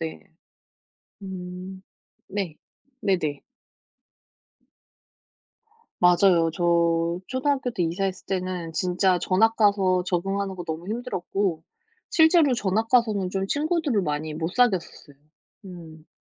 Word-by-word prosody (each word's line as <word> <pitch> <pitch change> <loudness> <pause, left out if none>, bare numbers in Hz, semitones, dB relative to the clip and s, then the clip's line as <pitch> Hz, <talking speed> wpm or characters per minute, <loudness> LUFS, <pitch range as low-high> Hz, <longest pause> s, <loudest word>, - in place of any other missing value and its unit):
네. 160 -1 -5 1.0
음 185 0 -8 0.5
네. 190 -6 -4 0.4
네네. 155 - 0 2.6
맞아요. 175 -1 +5
저 170 0 +1
초등학교 265 0 -1
때 230 -7 -2
이사했을 185 +3 -2
때는 185 -3 -3
진짜 180 +3 +1
전학 200 +6 +2
가서 195 -4 +3
적응하는 195 +2 -2
거 175 - -6
너무 165 +2 -5
힘들었고 200 -6 -2 0.5
실제로 320 -4 +4
전학 220 0 0
가서는 215 -6 +2
좀 195 +1 -2
친구들을 300 - 0
많이 155 -2 -3
못 160 +1 -3
사귀었었어요 190 - 0 0.5
음. 165 -3 -12
185 Hz, 220 characters per minute, -25 LUFS, 170-205 Hz, 2.6 s, 맞아요